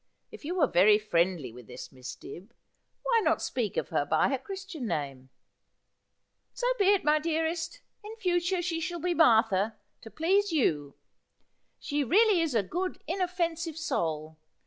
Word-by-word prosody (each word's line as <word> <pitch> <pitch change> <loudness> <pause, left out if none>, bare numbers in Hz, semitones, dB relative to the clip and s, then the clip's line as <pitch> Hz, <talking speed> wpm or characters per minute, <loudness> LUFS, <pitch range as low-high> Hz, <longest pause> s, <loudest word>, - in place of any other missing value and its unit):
If - - -12
you 340 +5 -3
were 335 -6 +4
very 210 -1 +5
friendly 175 - 0
with 125 -1 -13
this 125 0 -9
Miss 130 -1 -8
Dibb, 195 +11 -12 0.5
why 480 -2 +3
not - - +2
speak 230 -6 -3
of - - -1
her 155 -3 +1
by 145 - +2
her 270 -1 -1
christian 385 -5 -7
name 140 -6 -4 0.4
?' - - -51
' - - -51
So - - -3
be 400 - +3
it, 395 0 +4
my 300 +1 +3
dearest. 325 +6 -2 0.2
In 430 +2 -8
future 360 -3 0
she 330 -2 -1
shall 345 +1 -4
be 355 +2 0
Martha, 225 - +3 0.3
to 225 - -10
please 380 - +1
you. 150 - 0 0.8
She 290 -1 -1
really 395 - +4
is 315 -6 -1
a 215 - +3
good 360 - -3
inoffensive 340 -3 -2
soul. 160 - -2
310 Hz, 170 wpm, -29 LUFS, -, 0.8 s, very